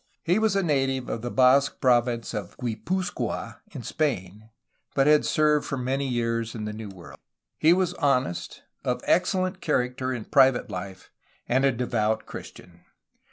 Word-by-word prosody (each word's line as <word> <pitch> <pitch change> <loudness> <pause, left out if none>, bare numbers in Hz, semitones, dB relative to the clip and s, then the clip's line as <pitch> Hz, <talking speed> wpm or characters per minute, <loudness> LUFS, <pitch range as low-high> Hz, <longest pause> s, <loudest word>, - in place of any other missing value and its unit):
He 180 +5 +2
was 220 -3 +2
a 195 - +2
native 135 -5 0
of 115 - -3
the 120 - -3
Basque 130 +2 +4
province 120 -2 +2
of 105 -5 -6
Guipuzcoa 180 - -3
in - - -7
Spain, 110 - -2 0.5
but 135 - +4
had 150 0 +5
served 150 -1 +2
for 135 - -2
many 135 +2 -1
years 115 -2 -1
in 105 -2 -4
the 105 - -4
New 110 -1 -7
World. 90 -3 -12 0.4
He 155 - +5
was 180 0 +2
honest, 130 - -1 0.2
of - - -1
ex 180 +2 +2
cellent 185 0 -1
character 130 -5 0
in 120 -4 -4
private 130 -2 +3
life, 95 0 -7 0.4
and 130 +3 +2
a 135 - +4
devout 110 -3 -1
Christian. - - -11
130 Hz, 160 wpm, -26 LUFS, 115-150 Hz, 0.5 s, had